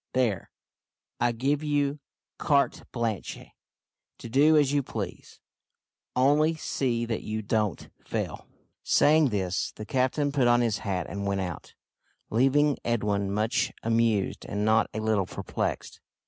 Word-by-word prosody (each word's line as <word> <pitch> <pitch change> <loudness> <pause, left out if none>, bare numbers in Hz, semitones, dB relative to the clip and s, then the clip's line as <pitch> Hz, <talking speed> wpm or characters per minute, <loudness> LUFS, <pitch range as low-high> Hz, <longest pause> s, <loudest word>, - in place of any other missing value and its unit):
There, 120 -8 0 0.7
I 120 0 +2
give 135 +5 0
you 145 -1 0 0.4
carte 140 -1 +1
blanche 115 -7 -3 0.8
to 115 - -9
do 150 +6 +5
as 145 -2 +3
you 145 - +3
please - - -7 0.8
only 150 +5 +3
see 120 -6 -1
that 115 -1 -3
you 110 0 -4
don't 105 -2 -1 0.2
fail." - - -4 0.3
Saying 150 -1 +4
this, 95 -4 -1
the 110 - -7
captain 130 +4 0
put 135 -4 +2
on 120 0 +4
his 115 -3 0
hat 95 -4 -2
and 100 0 -4
went 100 -1 0
out, 90 -4 -6 0.6
leaving 135 +5 +3
Edwin 105 -4 0
much 110 +4 0
amused 115 -3 +1
and 105 0 -2
not 110 0 +3
a 110 - -4
little 110 -4 +1
perplexed. - - -4
115 Hz, 135 wpm, -27 LUFS, 105-140 Hz, 0.8 s, do